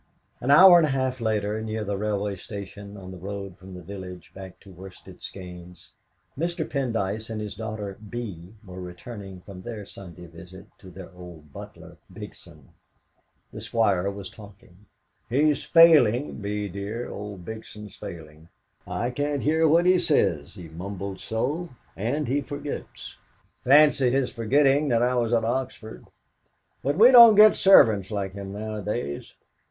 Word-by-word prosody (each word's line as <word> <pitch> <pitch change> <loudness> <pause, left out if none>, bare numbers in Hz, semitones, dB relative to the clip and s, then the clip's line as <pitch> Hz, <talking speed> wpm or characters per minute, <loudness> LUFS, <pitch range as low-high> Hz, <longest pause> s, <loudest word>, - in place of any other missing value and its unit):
An 125 - -4
hour 175 +5 +9
and 160 - +2
a - - -3
half 130 -2 -2
later, 110 -1 -1
near 110 0 -4
the 100 -1 -3
railway 105 0 -2
station, 100 +1 -9
on 95 -1 -10
the 95 - -10
road 100 0 -7
from 95 0 -12
the 90 - -10
village 90 -3 -9
back 95 -1 -11
to 100 - -15
Worsted 95 +1 -13
Skeynes, 90 -2 -11 0.4
Mr. 170 +2 -3
Pendyce 110 -5 -2
and 110 -1 -4
his 105 -1 -5
daughter 105 -2 -6
Bee 100 -5 -7
were 90 -1 -9
returning 95 +1 -9
from 95 -1 -11
their 110 -1 -7
Sunday 90 -3 -12
visit 90 +3 -13
to 95 - -13
their 95 +1 -11
old 85 -5 -13
butler, - - -12
Bigson. - - -13 0.8
The - - -8
Squire 100 -5 +1
was 100 0 -7
talking. 100 -2 -16 0.4
"He's 145 +4 +1
failing, 150 -6 +5
Bee 105 0 -3
dear 100 +5 -5
old 100 -3 -8
Bigson's 105 -2 -9
failing. 80 -5 -11 0.4
I 120 +1 -2
can't 145 +2 -2
hear 160 +2 +2
what 165 +3 +4
he 180 0 +4
says, 100 - 0
he 90 -4 -10
mumbles 95 +3 -7
so; 145 +10 -3 0.3
and 130 +9 -2
he 140 +4 0
forgets. 145 0 -8 0.5
Fancy 145 -1 +5
his 135 0 0
forgetting 135 +5 +2
that 120 -3 +2
I 125 +1 +1
was 120 -2 0
at 115 -2 +2
Oxford. 120 -2 -4 0.7
But 140 +3 -1
we 235 +5 +8
don't 235 -3 +9
get 215 +1 +8
servants 110 - +5
like 100 -3 -4
him 100 0 -8
nowadays. 105 -6 -5
105 Hz, 155 wpm, -25 LUFS, 95-130 Hz, 0.8 s, hour